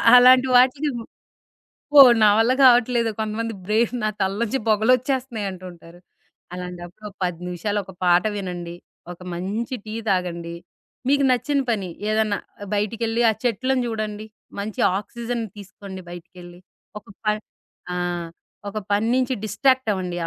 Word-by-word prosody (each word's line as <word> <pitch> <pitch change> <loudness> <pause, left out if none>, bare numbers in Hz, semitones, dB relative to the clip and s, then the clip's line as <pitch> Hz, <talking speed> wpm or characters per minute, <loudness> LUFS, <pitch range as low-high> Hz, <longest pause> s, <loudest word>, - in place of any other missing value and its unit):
అలాంటి 255 +1 +7
వాటికి 265 +4 +3
అబ్బో! 235 -3 -10 1.0
నా 210 - +7
వల్ల 230 +3 +3
కావట్లేదు. 240 -2 +5
కొంతమంది 220 +1 -2
బ్రెయిన్ 220 +4 +1
నా 215 - +2
తలలో 195 +4 0
నుంచి 270 +5 -1
పొగలొచ్చేస్తున్నాయి 245 +1 +1
అంటుంటారు. 175 -2 -12 0.5
అలాంటప్పుడొక 180 +3 -8
10 175 -2 -2
నిమిషాలు 190 +4 -2
ఒక 190 - -12
పాట 175 0 +4
వినండి. 175 -3 -5 0.4
ఒక 175 - -12
మంచి 205 +8 -3
టీ 215 - -7 0.2
తాగండి. 170 -3 -2 0.5
మీకు 280 +1 +3
నచ్చిన 255 +4 +1
పని 205 -5 -1 0.2
ఏదన్నా 215 -1 +1 0.3
ఆహ్, 205 - -8
బయటికెళ్ళి 225 +3 -1
ఆ - - +4
చెట్లను 255 +2 0
జూడండి. 215 -2 -4 0.3
మంచి 205 0 -4 0.2
ఆక్సిజన్ 235 +2 -5
తీసుకోండి 195 -1 -10
బయటికెళ్ళి. 175 0 -12 0.4
ఒక - - -33 0.2
ప - - -23 0.7
ఆ! - - -3 0.7
ఒక 215 +2 -4
పని 205 +2 +2
నుంచి 255 0 +1
డిస్ట్రాక్ట్ 260 +4 +1
అవ్వండి. 180 -3 -3
215 Hz, 130 wpm, -22 LUFS, 185-240 Hz, 1.0 s, అలాంటి